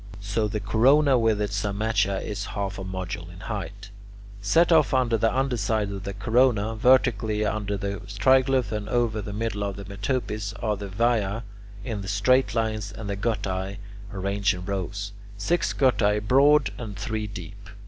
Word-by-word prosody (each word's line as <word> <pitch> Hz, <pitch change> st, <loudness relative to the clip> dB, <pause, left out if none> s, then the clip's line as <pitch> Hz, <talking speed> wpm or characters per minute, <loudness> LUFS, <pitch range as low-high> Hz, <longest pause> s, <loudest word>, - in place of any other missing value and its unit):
So 100 Hz, +2 st, -1 dB
the 105 Hz, +1 st, -3 dB
corona 130 Hz, +7 st, +4 dB
with 110 Hz, -2 st, +2 dB
its 105 Hz, -1 st, -1 dB
cymatia 100 Hz, -1 st, 0 dB
is 105 Hz, -1 st, -4 dB
half 100 Hz, 0 st, -3 dB
a -, -, -5 dB
module 95 Hz, -2 st, -5 dB
in 90 Hz, +1 st, -12 dB
height. 100 Hz, -1 st, -6 dB, 0.5 s
Set 165 Hz, -, +3 dB
off 155 Hz, -5 st, +4 dB
on 130 Hz, -2 st, +2 dB
the 115 Hz, -1 st, +2 dB
under 130 Hz, -1 st, 0 dB
side 105 Hz, -1 st, 0 dB
of 100 Hz, -1 st, -6 dB
the 100 Hz, -1 st, -5 dB
corona, 115 Hz, 0 st, +2 dB
vertically 110 Hz, -3 st, +3 dB
over 105 Hz, -1 st, -2 dB
the 100 Hz, 0 st, -3 dB
triglyphs 130 Hz, +3 st, +3 dB
and 105 Hz, -1 st, -4 dB
over 115 Hz, -3 st, +1 dB
the 105 Hz, -, -6 dB
middle 105 Hz, -1 st, -2 dB
of 100 Hz, -1 st, -3 dB
the 100 Hz, +1 st, -8 dB
metopes, 105 Hz, 0 st, -3 dB
are 105 Hz, +1 st, -2 dB
the 100 Hz, 0 st, -6 dB
viae 110 Hz, +1 st, 0 dB, 0.4 s
in 110 Hz, -5 st, -4 dB
straight 120 Hz, +6 st, +2 dB
lines 110 Hz, -3 st, -1 dB
and 105 Hz, -1 st, -6 dB
the -, -, -2 dB
guttae 100 Hz, -2 st, -2 dB, 0.3 s
arranged 100 Hz, 0 st, 0 dB
in 90 Hz, 0 st, -7 dB
rows, 100 Hz, +1 st, -3 dB, 0.3 s
six 170 Hz, +13 st, 0 dB
guttae 105 Hz, -6 st, +2 dB
broad 140 Hz, +7 st, +4 dB
and 105 Hz, -4 st, -6 dB
three 105 Hz, +1 st, -3 dB
deep. 100 Hz, +1 st, -9 dB
105 Hz, 170 wpm, -25 LUFS, 100-115 Hz, 0.5 s, corona